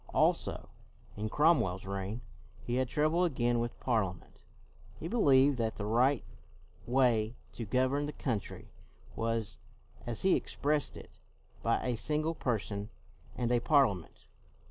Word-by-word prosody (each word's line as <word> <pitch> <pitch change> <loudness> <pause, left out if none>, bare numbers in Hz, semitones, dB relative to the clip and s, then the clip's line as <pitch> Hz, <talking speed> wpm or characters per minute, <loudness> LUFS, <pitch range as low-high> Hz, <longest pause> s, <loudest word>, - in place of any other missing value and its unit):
Also, - - +1 0.5
in 105 +1 -3
Cromwell's 115 - +2
reign, 100 +4 -4 0.4
he 120 +1 -1
had 130 -1 0
trou 150 +2 +2
ble 170 +3 +2
again 120 -8 +1
with 120 0 -3
Parliament. 100 -7 -2 0.6
He 165 - -4
believed 140 - +4
that 110 -1 -1
the 100 - -4
right 125 +5 +2 0.6
way 120 -3 +2 0.2
to 115 - -6
govern 130 +6 +1
the - - -4
country 115 -8 -4 0.4
was, 115 -1 -2 0.5
as 120 -2 -2
he 190 - +5
expressed 145 -1 -1
it, - - -13 0.4
by - - +1
a 125 -1 0
Single 155 +6 0
Person 105 -7 -2 0.5
and 120 -1 -1
a 120 - +4
Parliament. 120 - +1
120 Hz, 135 wpm, -32 LUFS, 110-145 Hz, 0.6 s, he